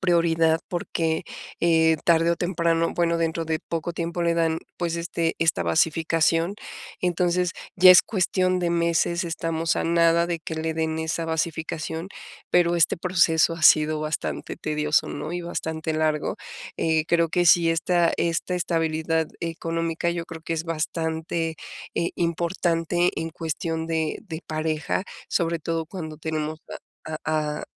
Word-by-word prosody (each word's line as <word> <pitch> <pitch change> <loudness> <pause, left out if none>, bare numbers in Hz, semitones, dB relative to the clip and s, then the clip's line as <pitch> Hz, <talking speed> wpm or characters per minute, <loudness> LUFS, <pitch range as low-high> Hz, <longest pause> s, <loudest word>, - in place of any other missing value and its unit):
prioridad, 165 -3 +3
porque, 165 -2 -2 0.4
eh, 160 -1 +4
tarde 165 0 +4
o - - -2
temprano 170 -2 0
bueno, 170 -1 +1
dentro 165 0 -1
de 160 0 -2
poco 165 +1 -4
tiempo 170 +1 -3
le 170 0 +2
dan, 165 -1 +1 0.2
pues, 170 -1 -2
este 170 -1 -2
esta 160 - +2
basificación. 165 - +2 0.5
Entonces, 180 0 +1 0.2
ya 185 0 +10
es 185 0 +7
cuestión 185 -2 +1
de 175 -1 0
meses, 170 +1 +1
estamos 165 -1 -1
a - - -1
nada 170 0 +3
de 170 -1 -3
que 160 0 -6
le 160 0 -2
den 160 0 -1
esa 160 +1 -2
basificación, 160 +1 -3 0.4
pero 175 -1 +3
este 170 -2 +3
proceso 170 -2 +3
ha 165 - -9
sido 155 0 +5
bastante 155 0 -3
tedioso, 150 0 0
¿no?, 155 - -5
y 175 - -2
bastante 160 -2 -3
largo. 155 -1 0 0.4
Eh, 160 -1 +1
creo 170 0 +2
que 175 +2 +1
sí, 165 0 +6
esta 170 +1 +2
esta 170 +2 -1
estabilidad 160 -2 0
económica 165 0 -2
yo 170 -1 -4
creo 160 -1 -9
que 165 - -3
es 160 0 -3
bastante, 160 0 -2 0.4
eh, 170 - 0
importante 170 0 0
en 165 0 -3
cuestión 160 0 -3
de 160 -1 -1
de 165 -3 -6
pareja, 155 +2 -2 0.2
sobre 170 -2 0
todo 165 0 -2
cuando 160 -3 -7
tenemos 155 0 -3 0.5
a 160 0 -3
a 150 -1 -1
a - - -6
165 Hz, 150 wpm, -24 LUFS, 160-170 Hz, 0.5 s, ya